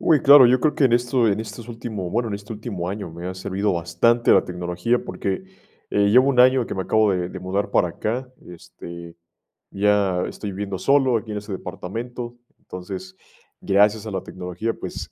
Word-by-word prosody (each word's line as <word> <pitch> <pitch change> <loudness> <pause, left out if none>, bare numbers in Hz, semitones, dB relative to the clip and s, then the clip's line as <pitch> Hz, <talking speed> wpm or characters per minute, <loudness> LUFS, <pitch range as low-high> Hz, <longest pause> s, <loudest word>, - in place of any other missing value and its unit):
Uy, 155 -4 +4
claro. 140 -2 +9
Yo 125 +1 +4
creo, 150 -2 +2
que 150 - +2
en 125 - +3
esto 120 -1 +2
en 100 +1 0
estos 115 +1 -8
últimos 110 -6 -5
bueno, 120 +2 -1
en 100 - -3
este 105 +2 -8
último 105 -5 -5
año, 100 -3 -5
me 85 +2 -8
ha 95 - -5
servido 95 +2 -2
bastante 85 +8 +2
la - - +4
tecnología, 90 +6 -1
porque, 95 - -3 0.5
eh, 100 0 +2
llevo 130 +5 +5
1 130 -3 +3
año, 130 -1 +5
que - - -5
me 95 - -2
acabo 110 +1 +2
de 90 -1 -2
de 95 - -8
mudar 95 +2 -2
para 90 - +2
acá. 120 +9 -3 0.2
Este, 85 0 -11 0.6
ya 100 -2 +1
estoy 105 -2 -6
viviendo 100 0 -4
solo, 130 +2 +3
aquí 110 0 -7
en 105 - -3
este 105 0 -7
departamento. 120 +6 -6 0.2
Entonces, 95 0 -8 0.4
gracias 105 +2 +2
a - - -5
la 95 -2 -3
tecnología, 90 +5 -4
pues, - - -7
105 Hz, 195 wpm, -22 LUFS, 95-120 Hz, 0.6 s, claro